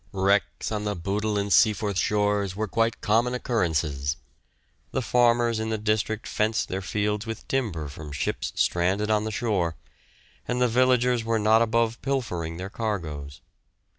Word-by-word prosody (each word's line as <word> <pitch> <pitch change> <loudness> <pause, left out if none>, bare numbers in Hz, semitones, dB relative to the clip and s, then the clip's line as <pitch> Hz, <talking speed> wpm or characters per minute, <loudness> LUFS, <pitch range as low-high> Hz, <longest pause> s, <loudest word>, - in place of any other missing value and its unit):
Wrecks 100 +3 +1
on 105 -1 -2
the 105 -1 -1
Bootle 105 +4 -1
and 100 -1 0
Seaforth 105 -3 +3
shores 105 -1 +1
were 110 +1 -2
quite 115 +2 0
common 115 +4 +2
occurrences. 75 - -1 0.7
The 130 - -2
farmers 120 -1 +3
in 110 0 -2
the 110 - 0
district 110 0 -1
fenced 110 +1 0
their 95 +1 -2
fields 105 +3 -1
with 115 -1 -6
timber 105 - -1
from 75 +1 -9
ships 70 - -2
stranded 95 +5 +1
on 105 0 +2
the 110 - -2
shore, 100 -8 0 0.7
and 125 0 -1
the 125 - +4
villagers 125 0 +3
were 115 0 +1
not 110 +1 +4
above 115 0 +1
pilfering 90 -12 -2
their 95 +2 -5
cargoes. 80 -12 -4
105 Hz, 155 wpm, -26 LUFS, 95-115 Hz, 0.7 s, the